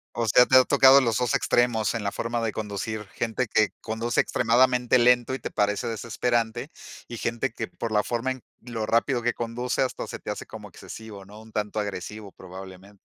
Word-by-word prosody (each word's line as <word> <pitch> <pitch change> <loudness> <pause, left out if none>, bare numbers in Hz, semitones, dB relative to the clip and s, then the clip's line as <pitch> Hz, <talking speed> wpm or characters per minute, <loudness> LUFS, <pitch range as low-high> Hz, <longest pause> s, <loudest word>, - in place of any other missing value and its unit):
O 115 -1 -1
sea, 125 +4 +6
te 130 - +3
ha 130 - +8
tocado 135 0 +6
los 115 -4 +1
2 125 -3 0
extremos 115 -4 +2
en 115 - -3
la 100 - -1
forma 115 +3 -3
de 110 - 0
conducir, 105 0 -4
gente 115 +2 -1
que 110 0 +2
conduce 115 +2 0
extremadamente 125 +1 +3
lento 125 +1 +4
y 135 - -3
te - - -5
parece 105 0 0
desesperante 115 0 -1 0.4
y 120 - -7
gente 115 0 -2
que, - - -5
por 115 - -6
la 105 -1 +2
forma 120 +2 -2
en 130 -2 -7 0.2
lo 115 -2 -4
rápido 120 +2 +1
que 120 0 +1
conduce, 120 +2 -2
hasta 130 - -2
se - - -7
te - - -8
hace - - -4
como - - -10
excesivo, 105 -3 -10
¿no? 105 +2 -13
Un 110 0 -15
tanto 105 0 -2
agresivo, 100 +1 -5
probablemente. 95 +2 -12
115 Hz, 200 wpm, -25 LUFS, 105-120 Hz, 0.4 s, ha